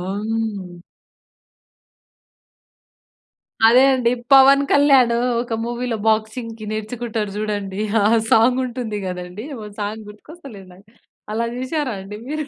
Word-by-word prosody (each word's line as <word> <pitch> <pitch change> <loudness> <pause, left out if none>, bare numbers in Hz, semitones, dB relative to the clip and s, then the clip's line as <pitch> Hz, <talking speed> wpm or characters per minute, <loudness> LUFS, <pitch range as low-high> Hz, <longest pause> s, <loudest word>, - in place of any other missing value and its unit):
అవును. 200 -2 -4 2.9
అదే 245 +3 +6
అండి. 245 -2 +1 0.2
'పవన్ 275 +1 +7
కళ్యాణ్' 275 -4 +5 0.3
ఒక 240 -1 -3
మూవీలో 240 0 -3
బాక్సింగ్‌కి 220 +1 -2
నేర్చుకుంటాడు 220 -1 -4
చూడండి. 205 -2 -3 0.2
ఆ - - +1 0.3
సాంగ్ 245 +3 +4
ఉంటుంది 235 -4 -5
కదండీ! 180 +3 -6 0.2
ఓన్ 210 -1 -10
సాంగ్ 210 +1 -5
గుర్తుకొస్తలేదు 210 - -13
నాకు. 195 +3 -20 0.5
అలా 230 +2 -1
జూసారా 260 +1 -2
అండి 195 +2 -9
మీరు? 305 0 -3
225 Hz, 105 wpm, -20 LUFS, 210-250 Hz, 2.9 s, పవన్